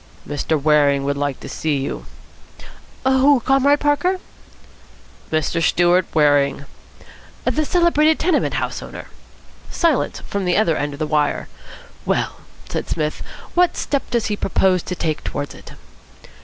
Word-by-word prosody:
"Mr. 145 +2 -1
Waring 145 -2 +3
would 140 +1 -1
like 145 -1 -2
to - - -8
see 155 -3 -1
you." 135 - -4 1.0
"Who, 265 +1 +5
Comrade 275 +3 +3
Parker?" 355 +6 +1 1.1
"Mr. 155 +1 0
Stewart 175 +1 +3
Waring." 145 -2 +3 0.8
"The 310 - +1
celebrated 320 -2 +3
tenement 340 -2 +1
house - - -2
owner?" - - -9 0.6
Silence 330 -6 0
from 200 -1 -4
the 180 - +2
other 185 -7 +3
end 145 -1 -2
of - - -8
the 155 - 0
wire. 150 -1 0 0.5
"Well," - - -1 0.3
said - - -4
Psmith, 155 -2 -2 0.3
"what 355 0 +3
step 280 -2 -2
does 235 -2 0
he 210 - -1
propose 190 -2 +1
to 180 - -5
take 155 -3 -2
towards 145 - -4
it?" - - -13
175 Hz, 140 wpm, -20 LUFS, -, 1.1 s, Who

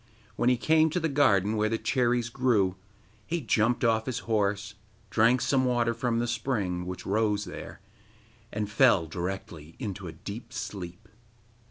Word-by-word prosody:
When 120 - +2
he 125 - +3
came 160 +5 +3
to 180 - -1
the 165 - -2
garden 110 - +3
where 110 0 +1
the 115 - 0
cherries 120 -1 +1
grew 115 -7 +2 0.5
he 170 +1 -1
jumped 120 -2 +1
off 110 -1 +2
his 125 -2 -2
horse, 105 -2 0 0.4
drank 115 +3 +4
some 135 -2 +2
water 120 -2 +1
from 120 -1 -1
the 120 - +1
spring, 110 -7 -2
which 90 -1 -6
rose 105 0 +1
there, - - -9 0.7
and 105 0 -2
fell 105 -5 +4
directly 85 -2 -6
into 100 -6 -5
a - - -5
deep 110 +9 -9
sleep. 105 -4 -6
110 Hz, 160 wpm, -28 LUFS, 100-125 Hz, 0.7 s, drank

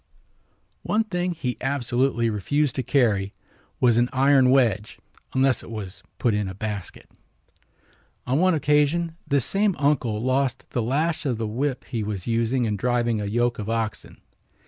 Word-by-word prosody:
One 220 +2 +1
thing 180 -4 -2
he 130 -7 -3
absolutely 130 -2 0
refused 145 +7 0
to - - +1
carry 110 -8 +1 0.4
was 120 -2 +4
an 120 +1 +3
iron 135 0 +4
wedge 115 -6 +2 0.4
unless 130 -2 +3
it - - -12
was 100 -3 -7 0.2
put 120 - +1
in 105 -1 0
a 95 - -6
basket. 105 -2 -6 1.2
On 130 +4 +1
one 185 -1 +4
occasion 150 +3 +1
this 140 -4 +1
same 200 -1 +1
uncle 130 -7 +1
lost 130 +2 0
the 120 - 0
lash 150 +7 0
of 125 -4 -1
the 115 - -2
whip 125 +5 -2
he 115 - -3
was 105 -4 -4
using 115 +2 +1
in 105 -2 -1
driving 120 0 0
a - - -3
yoke 120 +3 0
of 105 0 -4
oxen. 115 -2 -3
125 Hz, 160 wpm, -24 LUFS, 110-140 Hz, 1.2 s, was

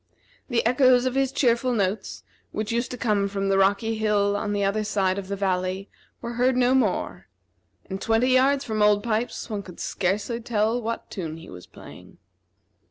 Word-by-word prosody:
The 235 -3 +1
echoes 250 +1 +4
of 255 - 0
his 270 -1 +1
cheerful 250 -2 +1
notes, 200 -2 -2 0.3
which 215 +1 -3
used 235 +2 -1
to 250 - -6
come 210 -4 +1
from 195 0 -2
the 195 - +3
rocky 205 +3 +2
hill 205 -2 +2
on 205 0 -2
the 205 -1 0
other 200 +2 0
side 195 -2 0
of 190 - -8
the 200 - -3
valley, 190 0 -2 0.3
were 235 - -4
heard 250 +2 +2
no 250 0 +3
more; 240 -8 0 0.6
and 190 0 -5
twenty 225 +3 +2
yards 270 +2 +3
from 215 -2 -2
Old 210 -1 +4
Pipes 230 +1 -2
one 210 -3 -4
could 185 -3 -12
scarcely 205 +6 -2
tell 225 +1 0
what 230 0 -5
tune 165 -5 -5
he 165 - -12
was 90 -1 -11
playing. - - -14
215 Hz, 185 wpm, -25 LUFS, 200-240 Hz, 0.6 s, echoes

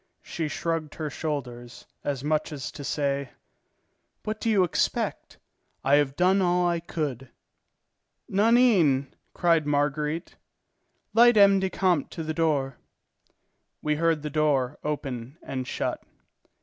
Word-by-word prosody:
She 165 -3 -3
shrugged 160 0 -3
her 155 -2 -4
shoulders, 125 -6 -5 0.2
as 140 -2 -3
much 155 +1 0
as 140 -4 -5
to 150 -2 -9
say: 140 -2 -1 0.9
"What 215 0 -4
do 230 - 0
you 205 -4 +4
expect? 175 - -1 0.5
I 140 +2 +4
have 140 -2 +1
done 185 +3 +3
all 180 -1 +2
I 170 -1 0
could." 145 -6 -4 1.0
"Nanine!" 200 - +3 0.2
cried 165 -4 +2
Marguerite. 150 +3 -1 0.8
"Light 240 0 +6
M. 200 -1 +7
le 190 0 -1
Comte 180 -5 +1
to 165 - -6
the 155 0 -3
door." 145 -5 0 1.1
We 150 -1 0
heard 165 -2 +1
the 150 - -4
door 145 -3 +1
open 135 -3 -4
and 130 -1 -4
shut. - - -3
155 Hz, 130 wpm, -26 LUFS, 140-175 Hz, 1.1 s, M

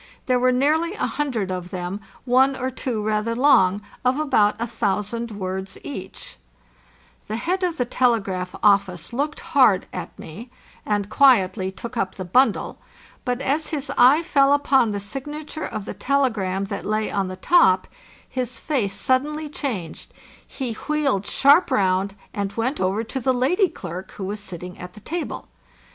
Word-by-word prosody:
There 250 -1 +2
were 255 +1 +3
nearly 310 +8 +1
a - - -1
hundred 240 -10 -2
of 180 -1 -4
them, 180 +2 -4 0.2
one 265 +2 +4
or 260 0 -3
two 245 -4 -3
rather 215 +2 0
long, 205 -7 +4 0.2
of 255 +3 +2
about 220 -9 +2
a 235 - -1
thousand 225 +1 -2
words 190 -2 -5
each, 190 -10 -8 0.9
The 215 - -3
head 360 +11 -1
of 350 -3 -1
the 245 - +1
telegraph 200 -8 0
office 195 -3 +2
looked 290 +5 -2
hard 260 - +4
at - - -6
me, 215 +10 -9 0.4
and 205 -2 0
quietly 195 -8 +4
took 225 +4 -8
up 190 -1 -1
the 185 - -6
bundle; 255 +10 +2 0.5
but 250 0 -1
as 300 +4 0
his 290 -3 -3
eye 270 +7 +6
fell 280 -4 +4
upon 275 -4 +3
the 205 -1 -2
signature 295 +8 -6
of 210 -2 -5
the - - -5
telegram 225 -9 0
that - - -5
lay 215 +1 -1
on 195 -1 0
the 185 - -5
top, 185 - +4 0.4
his 250 -2 -4
face 235 -9 -1
suddenly 300 +4 0
changed, 225 - -5 0.4
he 255 -4 -4
wheeled 275 -6 -1
sharp 285 +6 +5
round, 195 0 +1 0.2
and 200 -1 -3
went 245 +6 -2
over 190 +4 0
to 265 +4 -4
the 260 +1 +1
lady 355 - +2
clerk 185 - -8
who 195 - -7
was 205 +3 -3
sitting 180 -3 -8
at 180 0 -9
the - - -12
table. 335 - -5
230 Hz, 165 wpm, -23 LUFS, 195-275 Hz, 0.9 s, eye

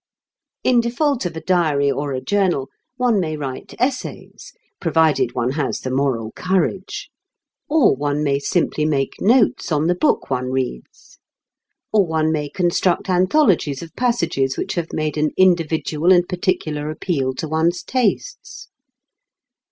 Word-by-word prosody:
In 250 -2 +4
default 245 - 0
of 165 - -8
a - - -5
diary 155 -6 +2
or 145 +1 -3
a 130 -1 -3
journal, 185 -9 0 0.3
one 245 -5 +2
may 155 -4 -2
write 135 -3 -6
essays 255 +1 -3 0.3
(provided 160 -7 +2
one 125 +1 0
has 145 +1 -2
the 130 - -4
moral 130 -5 -1
courage); 185 +1 -2 0.6
or 295 - +4
one 145 +2 -1
may 140 -1 +1
simply 150 +1 0
make 140 -3 -1
notes 225 -4 +3
on 150 0 +1
the 175 - +3
book 175 - 0
one 130 -1 0
reads. 130 - -5 0.7
Or 210 -2 +5
one 160 -2 0
may 150 -2 -2
construct 175 +1 0
anthologies 185 - +2
of 165 - -12
passages 170 - 0
which - - -2
have 170 -2 -3
made 155 0 -2
an 150 0 0
individual 165 -2 +2
and 175 -1 +5
particular 155 -5 -2
appeal 140 -5 -2
to 160 - -4
one's 160 +3 0
tastes. 250 -6 -2
160 Hz, 145 wpm, -20 LUFS, 145-185 Hz, 0.7 s, Or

